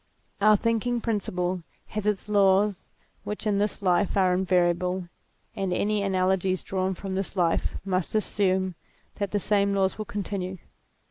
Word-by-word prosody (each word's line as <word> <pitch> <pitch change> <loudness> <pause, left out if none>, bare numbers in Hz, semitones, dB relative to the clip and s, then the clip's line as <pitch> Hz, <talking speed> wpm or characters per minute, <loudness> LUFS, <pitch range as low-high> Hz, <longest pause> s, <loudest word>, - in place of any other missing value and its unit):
Our 215 +1 +6
thinking 230 +2 0
principle 185 -5 -1 0.3
has 210 0 -3
its 210 0 0
laws 200 -1 +3 0.3
which 210 +1 -5
in 205 -2 +2
this 205 0 -1
life 185 +2 +2
are 185 -2 +4
invariable, 180 0 +1 0.5
and 195 -3 -2
any 205 +3 +1
analogies 185 -1 +1
drawn 190 0 -1
from 195 +1 -5
this 195 +1 -3
life 175 -3 +1
must 185 0 -1
assume 190 -3 +1 0.4
that 200 -2 -1
the 205 - 0
same 200 0 +2
laws 195 +1 +1
will 215 - -3
continue. 190 -2 -4
195 Hz, 145 wpm, -26 LUFS, 185-205 Hz, 0.5 s, Our